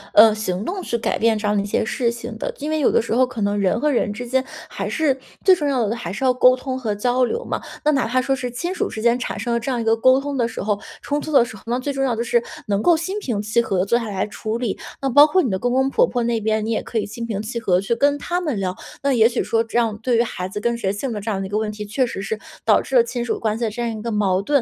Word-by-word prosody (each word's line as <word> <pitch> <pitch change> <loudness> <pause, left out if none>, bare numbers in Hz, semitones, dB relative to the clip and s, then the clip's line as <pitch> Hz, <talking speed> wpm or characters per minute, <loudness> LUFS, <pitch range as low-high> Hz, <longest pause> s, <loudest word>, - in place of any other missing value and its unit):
呃， 215 0 +8
行 205 -2 -3
动 375 +5 -3
去 235 - -2
改 225 - -1
变 225 -1 +3
这 210 0 -2
样 210 - +2
的 200 - +2
一 - - -4
些 205 - 0
事 235 +1 0
情 235 -1 -7
的。 - - -2
因 300 +2 -4
为 315 - 0
有 285 - +3
的 - - +4
时 225 - -2
候 255 +2 +4
可 250 -3 -7
能 205 0 +1
人 200 +3 +1
和 300 +3 +2
人 235 -5 +1
之 245 +4 -6
间 260 +2 +1 0.2
还 - - -4
是 275 -4 +1 0.3
最 375 -1 +7
重 295 -4 -2
要 245 -6 +1
的 225 - -1
还 175 -7 -5
是 230 +7 -3
要 255 - +4
沟 255 0 +5
通 255 0 -4
和 215 -5 -2
交 250 +4 +1
流 470 - -1
嘛。 - - -3 0.2
那 300 - +5
哪 270 -5 +1
怕 255 +2 +1
说 270 +1 +1
是 250 -1 -4
亲 345 +10 -3
属 - - -1
之 220 - -6
间， 235 +2 +3
产 - - -4
生 240 - -2
了 235 - +1
这 260 +3 -3
样 245 - -1
一 230 - -1
个 225 0 +3
沟 255 +3 +4
通 285 0 -4
的 235 -3 +1
时 225 - -6
候 205 0 0 0.2
冲 290 0 -1
突 310 - -6
的 240 -4 +5
时 220 - -9
候， - - -13
那 240 +1 0
最 280 +2 -3
重 270 - -1
要 255 -3 +1
的 235 - -1
是 235 0 +1 0.2
能 200 0 0
够 340 -2 +4
心 380 +6 -3
平 240 - -2
气 215 +3 +1
和 195 -4 -1
地 180 - +2
坐 235 +4 +2
下 230 - -4
来 195 -1 -1
处 215 +2 -4
理。 235 -5 -3 0.2
那 270 - +1
包 290 +4 +8
括 370 +3 +3
你 240 - -1
的 190 - -1
公 245 0 0
公 265 +1 +2
婆 - - +4
婆 245 -2 -1
那 230 -1 0
边， 215 0 0
你 225 - -2
也 220 - 0
可 230 - -5
以 215 - 0
心 230 +3 -6
平 210 -4 -3
气 235 +2 -4
和， 180 -5 +2
去 200 +5 -1
跟 285 +4 +2
他 350 +5 -2
们 295 - -2
聊。 185 -1 -2 0.3
那 280 - +2
也 225 -2 +5
许 245 - -1
说 225 0 +1
这 230 +1 -3
样 225 -3 +2
对 240 0 +1
于 235 - +4
孩 185 -5 -5
子 210 +1 -5
跟 235 +2 0
谁 195 -4 0
姓 235 +6 -3
的 210 - -4
这 220 - -4
样 200 -3 -1
的 195 - -3
一 - - -7
个 210 +1 0
问 215 -1 -2
题， 210 0 -7
确 250 +4 0
实 195 -3 -5
是 215 +2 -3 0.3
导 215 - +5
致 265 - -4
了 240 - +7
亲 240 0 -3
属 235 - -2
关 215 -1 0
系 235 - -4
的 220 - 0
这 240 +3 -4
样 235 - -1
一 215 - -7
个 235 +1 -3
矛 195 -3 +1
盾。 200 - -15
235 Hz, 360 characters per minute, -21 LUFS, 215-255 Hz, 0.3 s, 呃